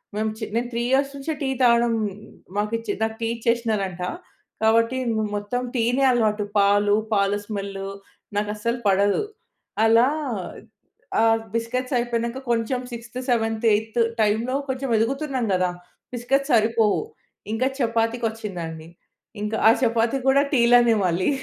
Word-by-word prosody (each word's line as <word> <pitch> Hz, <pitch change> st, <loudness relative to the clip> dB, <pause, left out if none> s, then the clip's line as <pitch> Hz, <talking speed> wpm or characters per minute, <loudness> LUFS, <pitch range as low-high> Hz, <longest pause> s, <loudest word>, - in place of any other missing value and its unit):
మేం 215 Hz, +1 st, 0 dB
చి 220 Hz, -, -3 dB
నేను 240 Hz, +1 st, 0 dB
3 235 Hz, 0 st, -1 dB
ఇయర్స్ 275 Hz, +1 st, +2 dB
నుంచే, 280 Hz, +3 st, -3 dB
టీ 265 Hz, -, 0 dB
తాగడం 235 Hz, -1 st, +4 dB, 0.6 s
మాకిచ్చే 225 Hz, +2 st, -1 dB
నాకు 220 Hz, 0 st, -1 dB
టీ 225 Hz, -, 0 dB
ఇచ్చేశ్నరంట. 220 Hz, -6 st, -1 dB, 0.6 s
గాబట్టి 230 Hz, +3 st, +3 dB, 0.2 s
మ్ 220 Hz, -, 0 dB
మొత్తం 245 Hz, +5 st, -3 dB
టీనే 245 Hz, +3 st, +1 dB
అలవాటు. 215 Hz, -3 st, +1 dB, 0.2 s
పాలు, 205 Hz, +1 st, +4 dB, 0.2 s
పాల 200 Hz, 0 st, +2 dB
స్మెల్లు 195 Hz, -2 st, -5 dB, 0.5 s
నాకు 205 Hz, 0 st, 0 dB
అస్సలు 235 Hz, +3 st, -2 dB
పడదు. 200 Hz, -, +3 dB, 0.6 s
అలా 230 Hz, +3 st, +5 dB, 1.1 s
ఆహ్, 225 Hz, 0 st, +4 dB
బిస్కెట్స్ 250 Hz, +3 st, -2 dB
అయిపోయినం, 235 Hz, -1 st, -1 dB
క -, -, -4 dB
కొంచెం 235 Hz, +2 st, 0 dB
సిక్స్త్, 235 Hz, +1 st, -8 dB
సెవెంత్, 225 Hz, -1 st, 0 dB
ఎయిత్ 220 Hz, +2 st, -1 dB, 0.2 s
టైమ్‌లో 225 Hz, +5 st, +1 dB
కొంచెం 265 Hz, 0 st, -2 dB
ఎదుగుతున్నాం 265 Hz, +2 st, -1 dB
గదా! 185 Hz, 0 st, +2 dB, 0.4 s
బిస్కెట్స్ 270 Hz, +3 st, 0 dB
సరిపోవు. 220 Hz, -1 st, +3 dB, 0.5 s
ఇంకా 250 Hz, +4 st, +1 dB
చపాతీకొచ్చిందండి. 225 Hz, -, -2 dB, 0.5 s
ఇంక 210 Hz, +1 st, -3 dB
ఆ -, -, +9 dB
చపాతీ 235 Hz, +2 st, +2 dB
గూడా 275 Hz, +1 st, +5 dB
టీలనే 240 Hz, -2 st, +5 dB
మళ్ళీ. 180 Hz, +5 st, +1 dB
230 Hz, 130 wpm, -23 LUFS, 210-240 Hz, 1.1 s, ఆ